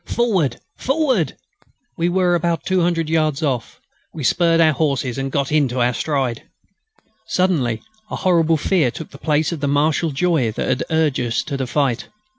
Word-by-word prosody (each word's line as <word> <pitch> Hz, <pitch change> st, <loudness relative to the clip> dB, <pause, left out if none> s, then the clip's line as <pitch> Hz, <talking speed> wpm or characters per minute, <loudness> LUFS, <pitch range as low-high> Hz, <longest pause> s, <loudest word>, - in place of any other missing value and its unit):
Forward! 190 Hz, -, +1 dB, 0.2 s
Forward! 260 Hz, -, +1 dB, 0.6 s
We 170 Hz, +1 st, 0 dB
were 180 Hz, 0 st, +2 dB
about 170 Hz, -2 st, 0 dB
200 175 Hz, -3 st, +1 dB
yards 155 Hz, -2 st, 0 dB
off. 130 Hz, -6 st, -2 dB, 0.3 s
We 155 Hz, -, -7 dB
spurred 165 Hz, +4 st, +3 dB
our 160 Hz, -1 st, +5 dB
horses 135 Hz, -3 st, -1 dB
and 135 Hz, 0 st, -3 dB
got 140 Hz, 0 st, -1 dB
into 135 Hz, -5 st, +1 dB
our 120 Hz, 0 st, +2 dB
stride. 135 Hz, -4 st, -1 dB, 0.9 s
Suddenly 150 Hz, -, 0 dB, 0.3 s
a -, -, -4 dB
horrible 165 Hz, -3 st, +2 dB
fear 155 Hz, -3 st, +2 dB
took 160 Hz, +6 st, -8 dB
the 140 Hz, -, -12 dB
place 155 Hz, 0 st, +1 dB
of 165 Hz, -, -4 dB
the 145 Hz, -, -1 dB
martial 150 Hz, +3 st, +1 dB
joy 150 Hz, -5 st, +1 dB
that -, -, -3 dB
had 125 Hz, -, 0 dB
urged 160 Hz, -4 st, +1 dB
us 120 Hz, -2 st, -1 dB
to 145 Hz, -, -4 dB
the 135 Hz, -2 st, -2 dB
fight. 130 Hz, -3 st, 0 dB
155 Hz, 170 wpm, -20 LUFS, 135-170 Hz, 0.9 s, our